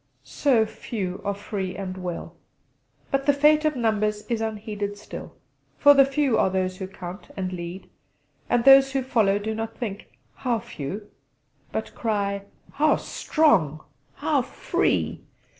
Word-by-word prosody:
so 250 Hz, -6 st, +2 dB
few 195 Hz, -4 st, -5 dB
are 200 Hz, 0 st, -1 dB
free 195 Hz, -2 st, -4 dB
and 190 Hz, -2 st, -5 dB
well. 180 Hz, -2 st, -6 dB, 0.8 s
But 275 Hz, 0 st, 0 dB
the 285 Hz, -, +6 dB
fate 300 Hz, +2 st, +4 dB
of 305 Hz, -1 st, +2 dB
numbers 215 Hz, -3 st, 0 dB
is 230 Hz, -2 st, -2 dB
unheeded 210 Hz, -2 st, -3 dB
still; 205 Hz, -, -9 dB, 0.4 s
for 285 Hz, 0 st, +8 dB
the 275 Hz, -1 st, +7 dB
few 275 Hz, -2 st, +1 dB
are -, -, +3 dB
those 185 Hz, 0 st, -1 dB
who 190 Hz, -, -5 dB
count, 185 Hz, 0 st, -9 dB
and 185 Hz, -1 st, -2 dB
lead; 175 Hz, +1 st, -6 dB, 0.6 s
and 240 Hz, -1 st, +2 dB
those 270 Hz, 0 st, +8 dB
who 270 Hz, -1 st, 0 dB
follow 220 Hz, -6 st, +2 dB
do 215 Hz, +2 st, -3 dB
not 225 Hz, +1 st, -5 dB
think 210 Hz, -4 st, -5 dB, 0.3 s
'How 245 Hz, -3 st, -1 dB
few,' 205 Hz, -2 st, -7 dB, 0.6 s
but -, -, -4 dB
cry 200 Hz, -3 st, -1 dB, 0.3 s
'How 305 Hz, +1 st, +3 dB
strong! 165 Hz, -, +1 dB, 0.3 s
How 290 Hz, -2 st, +1 dB
free!' 250 Hz, -, -1 dB
215 Hz, 145 wpm, -25 LUFS, 195-265 Hz, 0.8 s, for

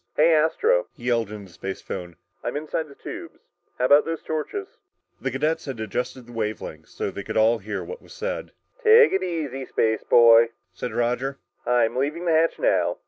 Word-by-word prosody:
"Hey, 160 Hz, +2 st, +5 dB
Astro," 435 Hz, -, +2 dB
he -, -, -15 dB
yelled 115 Hz, -3 st, +1 dB
into 105 Hz, -2 st, -8 dB
the 90 Hz, -, -17 dB
spacephone, 90 Hz, -2 st, -6 dB, 0.3 s
"I'm -, -, -2 dB
inside 155 Hz, +1 st, -3 dB
the 140 Hz, -, -15 dB
tubes. -, -, -8 dB, 0.4 s
How 125 Hz, -, +1 dB
about 145 Hz, +3 st, +6 dB
those 165 Hz, -1 st, -4 dB
torches?" 160 Hz, -, -3 dB, 0.5 s
The 130 Hz, -, -1 dB
cadets 155 Hz, +6 st, -1 dB
had 135 Hz, -5 st, -5 dB
adjusted 125 Hz, +4 st, -3 dB
the 120 Hz, -, -15 dB
wave 110 Hz, -2 st, -2 dB
length -, -, -9 dB
so -, -, -4 dB
that 100 Hz, +3 st, -5 dB
all 110 Hz, +1 st, +4 dB
could 95 Hz, -, -21 dB
hear 110 Hz, -, -3 dB
what 480 Hz, -, -8 dB
was -, -, -18 dB
said. -, -, -4 dB, 0.3 s
"Take 455 Hz, +1 st, +7 dB
it 190 Hz, -, +2 dB
easy, 155 Hz, -7 st, -3 dB
spaceboy," 115 Hz, +1 st, +5 dB, 0.3 s
said 120 Hz, +6 st, -5 dB
Roger, 125 Hz, +3 st, -1 dB, 0.3 s
"I'm 120 Hz, -2 st, +2 dB
leaving 150 Hz, +7 st, -1 dB
the 170 Hz, -, +2 dB
hatch 160 Hz, +1 st, +3 dB
now. -, -, +1 dB
135 Hz, 190 wpm, -24 LUFS, 115-165 Hz, 0.5 s, Take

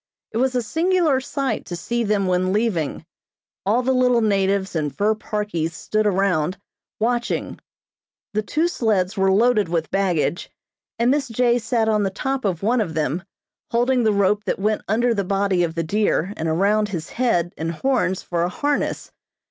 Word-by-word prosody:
It -, -, -3 dB
was 255 Hz, +1 st, +1 dB
a 245 Hz, -, +1 dB
singular 325 Hz, -, +2 dB
sight 270 Hz, -3 st, -2 dB
to 175 Hz, -, -4 dB
see 235 Hz, +7 st, -2 dB
them 205 Hz, -2 st, +1 dB
when 185 Hz, 0 st, +1 dB
leaving. 205 Hz, -9 st, -1 dB, 0.6 s
All 235 Hz, +5 st, +2 dB
the 260 Hz, -, +1 dB
little 250 Hz, -2 st, +3 dB
natives 195 Hz, -2 st, +1 dB
in 150 Hz, -2 st, 0 dB
fur 205 Hz, +8 st, +1 dB
parkies 210 Hz, -7 st, -3 dB
stood 215 Hz, +4 st, 0 dB
around, 185 Hz, -3 st, +1 dB, 0.4 s
watching. 240 Hz, +2 st, -1 dB, 0.7 s
The 215 Hz, -, +1 dB
two 310 Hz, +10 st, 0 dB
sleds 215 Hz, -, 0 dB
were 190 Hz, -1 st, +2 dB
loaded 210 Hz, -2 st, +3 dB
with 165 Hz, -2 st, -1 dB
baggage, 180 Hz, -4 st, 0 dB, 0.5 s
and 235 Hz, +2 st, +3 dB
Miss 280 Hz, -1 st, +1 dB
J. 240 Hz, +1 st, +2 dB
sat 230 Hz, -1 st, 0 dB
on 215 Hz, -1 st, +2 dB
the 195 Hz, -, +1 dB
top 265 Hz, +6 st, -3 dB
of 185 Hz, -3 st, -1 dB
one 235 Hz, +3 st, +2 dB
of 165 Hz, -7 st, -3 dB
them, 155 Hz, +2 st, -1 dB, 0.5 s
holding 245 Hz, +2 st, +2 dB
the 220 Hz, -, +3 dB
rope 200 Hz, +1 st, +2 dB
that -, -, -1 dB
went 210 Hz, +2 st, 0 dB
under 235 Hz, +3 st, +2 dB
the 200 Hz, -3 st, -1 dB
body 195 Hz, -1 st, +1 dB
of 165 Hz, -1 st, -2 dB
the 165 Hz, -, -1 dB
deer 200 Hz, +1 st, 0 dB
and 160 Hz, 0 st, -2 dB
around 205 Hz, +6 st, +2 dB
his 170 Hz, -5 st, -5 dB
Head 180 Hz, -9 st, 0 dB
and 165 Hz, +1 st, -3 dB
horns 190 Hz, -1 st, 0 dB
for 170 Hz, -1 st, -2 dB
a 175 Hz, -, +1 dB
harness. 290 Hz, +9 st, -2 dB
210 Hz, 180 wpm, -22 LUFS, 180-240 Hz, 0.7 s, little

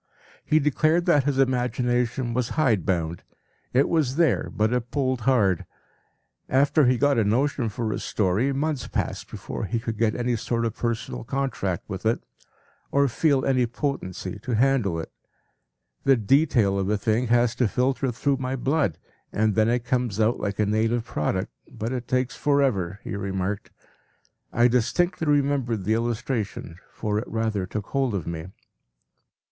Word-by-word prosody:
He 155 Hz, -, +2 dB
declared 155 Hz, +3 st, +2 dB
that 150 Hz, -7 st, +4 dB
his 145 Hz, -2 st, 0 dB
imagination 125 Hz, -1 st, 0 dB
was 125 Hz, 0 st, 0 dB
hide 115 Hz, -, +2 dB
bound; 85 Hz, -2 st, -1 dB, 0.5 s
it 130 Hz, +3 st, +3 dB
was 150 Hz, -6 st, +1 dB
there, 165 Hz, -1 st, +2 dB
but 110 Hz, +3 st, +1 dB
it 125 Hz, -1 st, -1 dB
pulled 130 Hz, -3 st, 0 dB
hard. 100 Hz, -9 st, +3 dB, 0.9 s
After 140 Hz, +1 st, +4 dB
he 125 Hz, 0 st, +3 dB
got 140 Hz, -1 st, +3 dB
a -, -, +3 dB
notion 125 Hz, +3 st, +1 dB
for 110 Hz, +1 st, -2 dB
a -, -, -3 dB
story, 105 Hz, +7 st, 0 dB
months 145 Hz, -1 st, -2 dB
passed -, -, -3 dB
before -, -, -5 dB
he 115 Hz, +4 st, -1 dB
could 115 Hz, -2 st, -5 dB
get 110 Hz, -1 st, +2 dB
any 120 Hz, 0 st, 0 dB
sort 115 Hz, +1 st, -1 dB
of 115 Hz, -1 st, -2 dB
personal 110 Hz, -, -3 dB
contract 130 Hz, -10 st, -2 dB
with 95 Hz, -3 st, -6 dB
it, 115 Hz, -, +2 dB, 0.7 s
or 140 Hz, 0 st, +3 dB
feel 140 Hz, +2 st, +2 dB
any 130 Hz, -3 st, +2 dB
potency 105 Hz, -, -4 dB
to 125 Hz, 0 st, -2 dB
handle 115 Hz, -8 st, +2 dB
it. 80 Hz, -, -7 dB, 0.9 s
“The 135 Hz, -1 st, +5 dB
detail 115 Hz, -4 st, +3 dB
of 95 Hz, 0 st, -1 dB
a 105 Hz, -, +2 dB
thing 110 Hz, +4 st, 0 dB
has 120 Hz, 0 st, +3 dB
to 125 Hz, -, +3 dB
filter 130 Hz, +4 st, 0 dB
through 135 Hz, +3 st, 0 dB
my 130 Hz, 0 st, -2 dB
blood, 135 Hz, -, 0 dB, 0.3 s
and 110 Hz, 0 st, +1 dB
then 110 Hz, +1 st, +3 dB
it 120 Hz, 0 st, 0 dB
comes 120 Hz, -4 st, -1 dB
out 110 Hz, +2 st, +2 dB
like 100 Hz, -1 st, -3 dB
a 105 Hz, -, +2 dB
native 110 Hz, +3 st, +1 dB
product, 95 Hz, -2 st, -2 dB, 0.2 s
but 115 Hz, +4 st, -4 dB
it 125 Hz, -1 st, -4 dB
takes 130 Hz, 0 st, 0 dB
forever,” 125 Hz, -, +1 dB
he -, -, -5 dB
remarked. 100 Hz, 0 st, -3 dB, 0.8 s
I 120 Hz, +1 st, +4 dB
distinctly 140 Hz, +8 st, +1 dB
remember 140 Hz, -5 st, +2 dB
the 105 Hz, +2 st, -1 dB
illustration, 115 Hz, -6 st, -2 dB
for 105 Hz, -1 st, -2 dB
it 115 Hz, -, -6 dB
rather 110 Hz, -4 st, -1 dB
took 105 Hz, +1 st, -4 dB
hold 135 Hz, -5 st, 0 dB
of 90 Hz, -6 st, -3 dB
me. 85 Hz, 0 st, -5 dB
120 Hz, 165 wpm, -25 LUFS, 105-135 Hz, 0.9 s, The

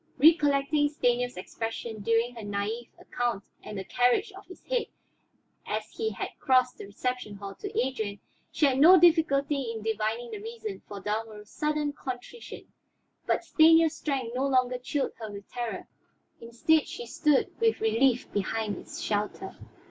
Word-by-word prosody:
Recollecting 290 Hz, -1 st, +4 dB
Stanief's 245 Hz, -5 st, 0 dB
expression 225 Hz, +3 st, -5 dB
during 230 Hz, +3 st, +1 dB
her 235 Hz, -, -8 dB
naïve 205 Hz, +3 st, -3 dB
account 240 Hz, -5 st, -2 dB, 0.2 s
and 210 Hz, -, -7 dB
the 190 Hz, -, -3 dB
carriage 250 Hz, -, +2 dB
of 385 Hz, 0 st, -13 dB
his 365 Hz, -, -13 dB
head -, -, -1 dB, 0.8 s
as -, -, -3 dB
he 445 Hz, 0 st, -2 dB
had -, -, -4 dB
crossed 255 Hz, -2 st, +2 dB
the -, -, -7 dB
reception 240 Hz, 0 st, -3 dB
hall 200 Hz, 0 st, -7 dB
to 405 Hz, -, -5 dB
Adrian, 220 Hz, -6 st, -2 dB, 0.3 s
she 305 Hz, -, +2 dB
had 265 Hz, -2 st, +2 dB
no 350 Hz, +5 st, +9 dB
difficulty 300 Hz, -4 st, +4 dB
in 220 Hz, -2 st, -6 dB
divining 220 Hz, +2 st, -2 dB
the 410 Hz, -, -6 dB
reason 445 Hz, -2 st, -6 dB
for 205 Hz, -, -7 dB
Dalmorov's 210 Hz, 0 st, -4 dB
sudden 300 Hz, -1 st, -1 dB
contrition. 260 Hz, -, -8 dB, 0.6 s
But -, -, +1 dB
Stanief's 325 Hz, 0 st, +5 dB
strength 265 Hz, -6 st, -2 dB
no 260 Hz, +2 st, 0 dB
longer 255 Hz, -2 st, +2 dB
chilled 270 Hz, +3 st, -2 dB
her 220 Hz, -2 st, -6 dB
with 200 Hz, -1 st, -9 dB
terror; 240 Hz, -2 st, -4 dB, 0.5 s
instead 245 Hz, +7 st, +2 dB
she 240 Hz, -, -7 dB
stood 295 Hz, +4 st, +2 dB
with 455 Hz, -1 st, +2 dB
relief 230 Hz, +3 st, +2 dB
behind 210 Hz, +1 st, -2 dB
its -, -, -9 dB
shelter. 205 Hz, 0 st, -2 dB
250 Hz, 155 wpm, -28 LUFS, 220-300 Hz, 0.8 s, no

